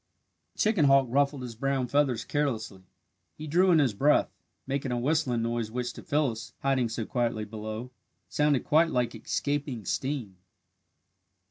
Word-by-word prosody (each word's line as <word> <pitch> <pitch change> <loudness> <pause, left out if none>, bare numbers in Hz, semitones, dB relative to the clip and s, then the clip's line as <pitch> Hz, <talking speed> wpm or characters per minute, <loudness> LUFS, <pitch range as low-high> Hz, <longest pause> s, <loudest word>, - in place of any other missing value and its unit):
The - - -22
chicken 215 -8 +3
hawk 135 -1 +5
ruffled 140 0 +1
his 120 -2 -6
brown 135 +2 -1
feathers 125 -3 +1
carelessly. 110 -10 -2 0.6
He 155 - -7
drew 175 +5 +3
in 170 - +6
his 135 -7 +3
breath, 140 +9 +3 0.3
making 135 -1 -2
a 120 - 0
whistling 130 -3 +1
noise 115 -1 -2
which 120 +1 -3
to - - -10
Phyllis, 140 -7 -1
hiding 135 -3 +1
so 115 0 -3
quietly 115 -3 -1
below, 110 +3 -6 0.4
sounded 150 -3 +1
quite 165 +2 +4
like 125 -4 0
escaping 140 0 -3
steam. 130 -9 -3
130 Hz, 150 wpm, -28 LUFS, 115-145 Hz, 0.6 s, in